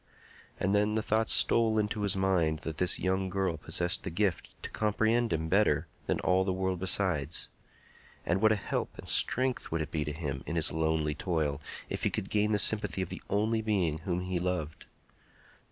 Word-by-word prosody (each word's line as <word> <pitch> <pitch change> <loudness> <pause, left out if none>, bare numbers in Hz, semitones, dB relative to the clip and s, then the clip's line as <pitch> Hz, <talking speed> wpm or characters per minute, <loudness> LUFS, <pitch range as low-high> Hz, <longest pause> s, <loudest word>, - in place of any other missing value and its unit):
And 100 - 0
then 105 +1 +2
the 110 - 0
thought 110 +1 +1
stole 115 -1 +4
into 105 0 -1
his 100 -2 0
mind 90 -5 +1
that 80 -1 -4
this 90 0 +1
young 95 0 -1
girl 95 -3 -1
possessed 85 +3 -1
the - - -4
gift 95 +1 -1
to - - -6
comprehend 110 +2 +1
him 80 0 -1
better 95 -5 +2 0.2
than - - 0
all 95 0 +2
the 95 - -1
world 95 -1 -2
besides. 90 -5 0 0.8
And 90 +3 0
what 110 0 +5
a - - +4
help 105 - -4
and - - -10
strength 130 0 +3
would 80 - -1
it 75 -1 -5
be 75 -2 -1
to 75 - -4
him 70 -4 -4
in 85 - -3
his 80 -2 +1
lonely 80 -1 0
toil 75 -3 -2 0.3
if - - -4
he - - +2
could 95 - -4
gain 105 0 +2
the 105 - +3
sympathy 105 -2 +2
of 90 - -7
the - - -6
only 110 +3 +1
being 95 -8 0
whom 90 +2 -2
he 90 -1 -2
loved! 90 -4 -3
95 Hz, 200 wpm, -30 LUFS, 80-105 Hz, 0.8 s, what